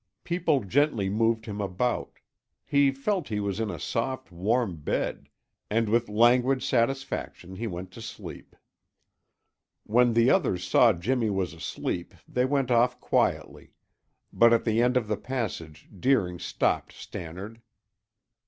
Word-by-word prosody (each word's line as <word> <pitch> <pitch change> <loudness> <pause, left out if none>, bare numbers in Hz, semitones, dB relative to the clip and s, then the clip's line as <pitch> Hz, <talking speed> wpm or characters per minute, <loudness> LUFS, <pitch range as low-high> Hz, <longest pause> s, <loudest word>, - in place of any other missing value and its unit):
People 165 -7 +1
gently 115 -2 +1
moved 115 +1 +1
him 105 -1 -5
about; 100 +6 -2 0.5
he 140 -1 +4
felt 170 +8 -2
he 105 -2 -2
was 100 0 -2
in 110 -2 -1
a 85 -5 -5
soft, 130 - -3
warm 100 +2 0
bed, 75 - -3 0.4
and 115 +1 +1
with 115 +1 +1
languid 125 +4 +3
satisfaction 120 -7 -2
he 115 +3 -3
went 90 -1 -6
to 115 - -11
sleep. 110 - -9 1.3
When 120 +2 +3
the 115 +2 +5
others 110 - +1
saw 115 +5 +6
Jimmy 110 +6 0
was 95 -3 -1
asleep 85 +1 -4
they 125 0 +1
went 135 -2 0
off 125 +1 +3
quietly, - - -1 0.6
but 115 0 +6
at 115 - +3
the 115 0 +2
end 125 +1 +3
of 120 -4 -1
the 105 -1 -1
passage 95 - -5
Deering 95 -8 +1
stopped - - -1
Stannard. 95 +7 -8
115 Hz, 140 wpm, -27 LUFS, 100-125 Hz, 1.3 s, saw